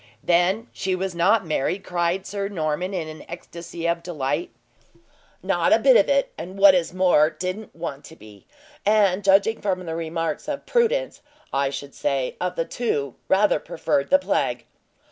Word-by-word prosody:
"Then 180 +6 +2
she 190 -1 -1
was 190 0 -3
not 190 +4 +3
married?" 160 +5 -1
cried 175 +2 -1
Sir 200 -1 -3
Norman, 175 -1 -2
in 175 -5 -3
an 155 0 -9
ecstasy 170 0 -6
of 170 0 0
delight. 170 - -2 0.9
"Not - - +1
a - - +7
bit - - +5
of - - +5
it; 275 -1 +2
and 180 +4 -7
what 195 -1 +8
is 175 -3 +1
more, 180 -4 +4
didn't 185 +6 -6
want 160 -4 -6
to 160 - -13
be; 105 - -16 0.4
and 205 -2 +3
judging 200 +3 +3
from 185 -3 -2
the 165 - -4
remarks 165 - -3
of 290 -2 -4
Prudence, - - 0 0.3
I 135 0 +1
should 140 0 -7
say, 135 -2 -1
of 180 0 -2
the 165 - -1
two, 145 - -2
rather 195 -3 +3
preferred 140 -3 -1
the 280 - +6
plague." 280 - -1
180 Hz, 170 wpm, -23 LUFS, 160-200 Hz, 0.9 s, what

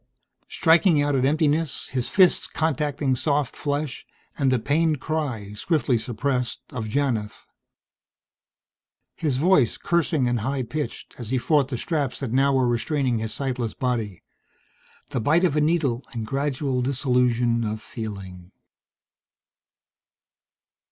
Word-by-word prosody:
Striking 165 0 +4
out 145 0 0
at 130 -1 +2
emptiness, 155 +1 +1
his 125 -2 -1
fists 185 -3 +4
contacting 145 -3 0
soft 145 0 0
flesh, 145 -1 -3 0.3
and 135 -2 +1
the 130 - +3
pained 150 +4 +1
cry, 130 -10 -3
swiftly 135 - 0
suppressed, 125 +2 -2
of 110 -4 -4
Janith. 115 -4 -2 1.7
His 145 -6 -1
voice, 150 -5 +3
cursing 165 -6 +1
and 120 -1 0
high 130 +4 -2
pitched, 150 +5 -5
as 115 -3 -6
he 130 - +1
fought 145 +1 +2
the 130 -3 -4
straps 145 -1 -2
that 135 -5 -4
now 135 +2 +3
were 130 -2 +2
restraining 120 0 0
his 110 0 -4
sightless 125 -1 -3
body. 115 -7 -2 0.9
The 125 - -2
bite 160 - +3
of 170 -5 +2
a 150 - +3
needle 150 -6 +1
and 115 -2 -4
gradual 135 0 -1
dissolution 125 -3 +1
of 110 0 -3
feeling.... 95 -5 -8
130 Hz, 130 wpm, -24 LUFS, 120-150 Hz, 1.7 s, Striking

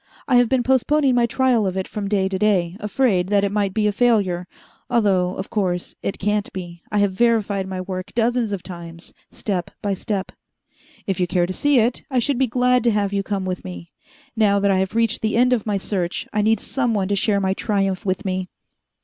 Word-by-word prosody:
I 255 - +4
have 245 -2 +4
been 260 -2 +2
postponing 265 +2 +2
my 240 -1 +3
trial 240 -3 +2
of 190 0 -3
it 190 - -2
from 205 -2 -4
day 195 -2 +1
to 190 -1 -3
day, 185 -5 +2
afraid 210 -4 +1
that 200 0 +2
it 200 - 0
might 205 -2 0
be 215 +2 0
a 210 - +3
failure 200 -6 +1 0.4
although, 190 -5 +2
of 190 - -6
course, 180 -4 -1
it - - -3
can't 210 +1 -1
be. 175 -3 -7
I 210 - 0
have 205 -1 +3
verified 210 -3 +1
my 185 -1 -4
work 185 +1 -6
dozens 235 -1 +1
of 195 -3 -4
times, 170 -2 -10 0.2
step 185 -5 -3
by 200 -1 -1
step. 195 0 -3 0.7
"If 195 -2 -2
you 180 - +1
care 175 0 +1
to 185 - -4
see 290 +6 +2
it, 235 +1 +2
I 260 - -1
should 250 +2 +1
be 265 - +3
glad 250 +1 +2
to - - +5
have 205 -2 0
you 200 - +1
come 195 -1 -3
with 185 -1 -3
me. 90 -2 -9 0.4
Now 210 -2 +3
that 200 0 +2
I 190 - +2
have 190 +2 -2
reached 230 -1 +1
the 220 0 0
end 250 +1 +4
of 225 -3 -1
my 205 -1 +1
search, 185 -2 -3
I 210 - +2
need 220 0 +2
someone 230 -8 -1
to 200 - +2
share 200 0 +1
my 190 -1 +1
triumph 195 -2 -1
with 190 +1 -2
me." 185 -1 -2
200 Hz, 225 wpm, -21 LUFS, 185-230 Hz, 0.7 s, to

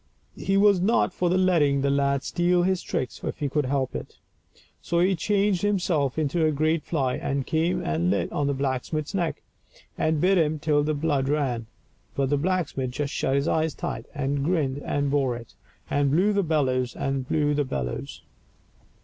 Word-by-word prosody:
He 195 0 +1
was 200 -2 +5
not 195 -1 +2
for 180 - 0
letting 170 -7 +3
the 140 0 +1
lad 140 0 +1
steal 175 0 +1
his 185 0 +1
tricks 130 - -4
if - - -3
he 145 - -1
could 145 +1 0
help 135 -1 -1
it. - - -7 0.6
So 170 - 0
he 185 +2 +3
changed 200 +1 +1
himself 175 -10 0
into 160 +2 0
a 155 - +4
great 155 +2 +1
fly, 135 -7 -1
and 140 -1 -2
came 165 +3 0
and 80 +3 0
lit 100 - 0
on 145 - 0
the 140 - 0
blacksmith's 140 +4 -2
neck, 175 -4 -2 0.6
and 155 -1 +1
bit 185 +3 +3
him 155 -1 +1
till 150 -1 +2
the 155 +1 0
blood 145 -3 0
ran; 130 -6 -1 0.5
but 135 -1 0
the 145 - +3
blacksmith 155 -5 -1
just 140 +3 -3
shut 135 - 0
his 140 +3 +1
eyes 160 -1 0
tight, - - -5
and 140 0 -1
grinned 145 -5 0
and 145 -1 -1
bore 135 -4 +1
it, 115 -1 -10 0.3
and 145 -1 +1
blew 185 +9 +3
the 200 - +2
bellows 130 -7 0
and 135 -1 -2
blew 150 -1 +1
the 145 0 +1
bellows. 65 - -5
145 Hz, 185 wpm, -25 LUFS, 135-175 Hz, 0.6 s, was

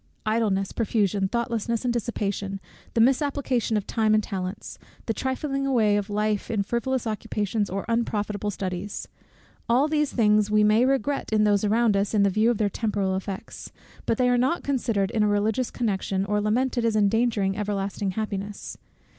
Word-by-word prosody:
Idleness, 215 -3 +1
profusion, 205 -3 0
thoughtlessness, 235 +1 -2
and 240 - +1
dissipation, 200 -4 -2 0.4
the - - +2
misapplication 260 -3 +1
of 205 - -2
time 220 -2 +1
or - - +6
of 215 - +2
talents, 190 0 -5 0.3
the 225 - 0
trifling 275 +2 -2
away 220 -6 +3
of 205 0 -1
life 210 0 -1
in 215 -4 0
frivolous 240 +4 -1
occupations 210 -1 -2
or 195 +1 -3
unprofitable 210 -3 -1
studies; 190 0 -4 0.6
all 255 +5 +4
these 300 -2 0
things 210 -2 +3
we 210 0 +4
may 215 +4 +4
regret 270 0 0
in 215 -1 +3
those 205 -1 +3
around 220 0 +3
us, 200 +2 0
in 205 - +4
the 200 - +3
view 215 +4 +3
of 240 - +1
their 210 - +2
temporal 200 -2 -1
effects; 190 0 -6 0.4
but 225 - +1
they 250 - +3
are 245 0 +3
not 265 +8 +1
considered 230 -8 0
in 220 - 0
a 210 - +4
religious 210 +4 +1
connection, 195 -4 -1
or 210 +1 0
lamented 240 +3 0
as 230 -1 +1
endangering 210 -1 +2
everlasting 200 -1 -2
happiness. 205 0 -5
215 Hz, 170 wpm, -25 LUFS, 200-235 Hz, 0.6 s, or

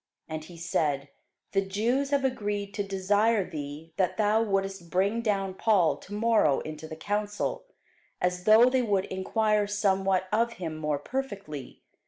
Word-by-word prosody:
And 155 -1 -5
he 170 +2 -12
said, 150 -4 -1 0.4
The 195 - +2
Jews 230 +8 0
have 280 -1 +1
agreed 205 -5 -2
to 205 - -2
desire 200 +2 +1
thee 150 +2 -7
that 185 -3 +1
thou 215 +1 +3
wouldest 195 -4 -1
bring 200 +6 +1
down 195 -4 0
Paul 190 -4 +3
to - - -15
morrow 215 -10 +3
into 155 0 -7
the 155 - -7
council, 205 - -2 0.5
as 180 0 -1
though 220 +3 +7
they 255 0 +3
would 200 -5 +1
enquire 210 +2 +1
somewhat 195 -2 +1
of 230 +2 +2
him 165 -6 -5
more 150 -2 -1
perfectly. 195 - -6
195 Hz, 155 wpm, -28 LUFS, 175-215 Hz, 0.5 s, though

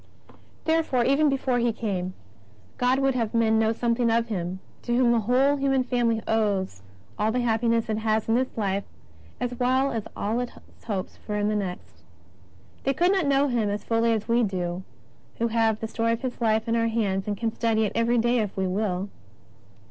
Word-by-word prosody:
33 320 - +3
Therefore, 275 -7 +1
even 285 +3 +4
before 265 -2 0
He 235 0 +2
came, 190 -5 -3 0.6
God 250 +1 +3
would 270 0 +2
have 230 -3 -1
men 220 -1 +3
knovt^ 225 0 +2
something 235 0 +1
of 230 0 +1
Him 185 -2 -3 0.2
to 240 0 0
whom 245 -2 +4
the 235 - +3
whole 260 +6 +3
human 270 -1 +2
family 235 -3 0
owes 200 - 0 0.4
all 215 +1 +2
the 250 +2 0
happiness 230 0 +1
it 215 -1 -1
has 220 0 0
in 225 - +2
this 255 +1 0
life 200 -2 0 0.6
as 245 0 -2
well 260 +2 +2
as 225 -4 -3
all 220 +4 -1
it 245 -1 -4 0.3
hopes 200 -5 -4
for 210 - -5
in 205 0 +1
the 215 - 0
next. 190 -4 -5 0.8
They 275 - 0
could 350 +6 +3
not 380 -6 +1
know 280 +1 +3
Him 235 -5 0
as 205 0 -3
fully 230 0 +2
as 220 -2 -1
we 235 +1 +3
do 180 -4 -2 0.6
who 230 0 0
have 225 -1 +2
the 225 - -3
story 230 +1 0
of 230 - -4
His 250 -1 -4
Life 220 -1 +2
in 230 - +1
our 230 0 +2
hands 205 -4 -1
and 205 -1 -2
can 225 0 -1
study 225 -2 +1
it 205 - -2
every 235 +1 +2
day 240 +1 +2
if 210 -3 -3
we 190 - +1
will. 190 0 -1
230 Hz, 205 wpm, -26 LUFS, 210-245 Hz, 0.8 s, even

